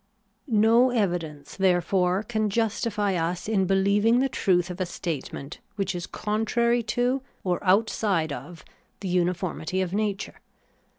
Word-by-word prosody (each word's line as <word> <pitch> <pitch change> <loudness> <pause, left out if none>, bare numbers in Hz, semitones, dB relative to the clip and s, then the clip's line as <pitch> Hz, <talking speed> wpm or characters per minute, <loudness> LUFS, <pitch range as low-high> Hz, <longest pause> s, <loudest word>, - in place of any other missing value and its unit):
No 230 +2 +4
evidence, 175 - -2
therefore, 185 0 +2
can 215 -1 -1
justify 210 -1 0
us 175 +1 -2
in 195 -4 +1
beUeving 200 +5 +3
the 270 +1 +2
truth 180 -6 +1
of 180 +2 -6
a - - +1
statement 155 -4 -5 0.2
which 195 -3 -1
is 175 -1 -5
contrary 235 +3 0 0.2
to, 250 +2 +1 0.2
or 180 -2 -1
outside 195 -5 +2
of, 155 +6 -9 0.4
the 195 - -4
uniformity 180 0 -1
of 185 -1 -1
nature. 205 -1 -2
195 Hz, 130 wpm, -26 LUFS, 175-220 Hz, 0.4 s, No